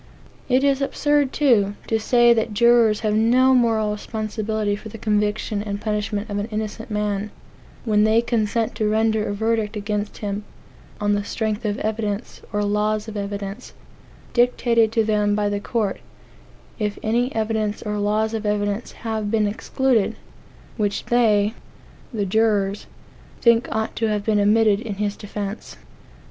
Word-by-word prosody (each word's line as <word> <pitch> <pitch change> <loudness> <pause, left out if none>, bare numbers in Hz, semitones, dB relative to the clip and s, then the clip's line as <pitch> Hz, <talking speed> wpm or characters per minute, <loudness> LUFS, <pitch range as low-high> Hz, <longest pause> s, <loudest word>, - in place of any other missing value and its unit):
It 255 +1 +3
is 280 -1 +2
absurd, 290 0 +1
too, 215 -9 +3
to 225 - 0
say 240 +1 +5
that 220 -2 -1
jurors 235 -1 +4
have 215 -1 0
no 245 +4 +4
moral 225 -4 +2
responsibility 215 0 -2
for 220 +2 -9
the 225 - -9
conviction 210 0 0
and 205 -1 -4
punishment 210 0 -2
of 205 -2 -3
an 205 - -3
innocent 220 0 -5
man, 210 -1 -1 0.6
when 210 -2 +3
they 220 +1 +4
consent 230 -1 0
to 215 -1 +1
render 220 0 +2
a - - -2
verdict 220 0 0
against 210 0 -3
him 205 0 -4 0.6
on 205 -1 +1
the 205 0 0
strength 220 +2 -3
of 205 -1 -1
evidence, 215 0 -3
or 205 -1 0
laws 210 +1 0
of 220 - -7
evidence, 200 +2 -5 0.6
dictated 240 -2 +3
to 225 - +3
them 210 -1 +1
by 205 -1 +1
the 205 0 -1
court, 210 -1 -2 0.8
if 210 -1 -2
any 240 +4 +1
evidence 220 -1 -1
or 210 -1 -2
laws 215 +2 0
of 220 -1 -3
evidence 205 +1 -1
have 220 -2 -2
been 215 -1 +2
excluded, 225 +1 0 0.6
which 205 -2 -1
they 215 -3 +3 0.6
(the 210 -5 -1
jurors) 205 -1 +1 0.5
think 235 0 +4
ought 220 0 -2
to 225 - +1
have 210 -1 -1
been 215 -2 +2
admitted 210 0 +4
in 220 -4 -5
his 205 0 -2
defence. 205 0 -6
215 Hz, 155 wpm, -22 LUFS, 205-225 Hz, 0.8 s, say